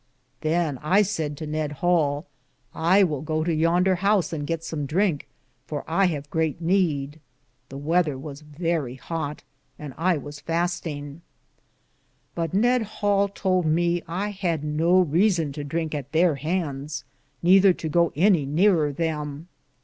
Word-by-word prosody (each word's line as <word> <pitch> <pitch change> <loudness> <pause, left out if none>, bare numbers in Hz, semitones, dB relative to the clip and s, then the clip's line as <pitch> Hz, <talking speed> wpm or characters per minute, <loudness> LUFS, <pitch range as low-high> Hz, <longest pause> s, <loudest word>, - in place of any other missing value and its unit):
Than 155 -4 0 0.2
saide 165 -7 -2
I - - -9
to 155 - -6
Ned 155 -1 -2
Hale: 150 -2 +1 0.5
I 185 +5 +4
will 150 -7 -1
go 155 0 -1
to 170 0 0
yender 175 +4 +2
house 195 -2 +1
and 145 -2 -3
gitt 165 -1 -2
som 150 -3 -4
drinke, 165 -3 0 0.4
for 150 -2 -4
I 180 +4 +2
have 145 -4 -3
greate 160 -1 0
neede. 160 -5 0 0.5
The 135 - -8
wether 155 0 +1
was 140 +1 -8
verrie 150 -3 -2
hote, 150 +1 -5 0.3
and 150 -3 -8
I 175 0 +2
was 145 0 -8
fastinge. 165 -4 -3 1.1
But 165 -2 -2
Ned 240 +5 +3
Hale 205 -2 +1
tould 185 -3 0
me 170 +2 +2
that - - -19
I 190 +5 -2
had 180 -7 -2
no 165 +5 +3
reason 170 -1 +2
to 145 +1 -6
drinke 160 +2 -3
at 145 -1 -5
there 165 +1 +4
handes, 145 -3 -3 0.4
nether 190 +2 +6
to 165 - -5
go 170 +2 +2
any 175 -2 +4
nearer 160 -1 +3
them. 150 +1 -4
165 Hz, 155 wpm, -24 LUFS, 150-180 Hz, 1.1 s, nether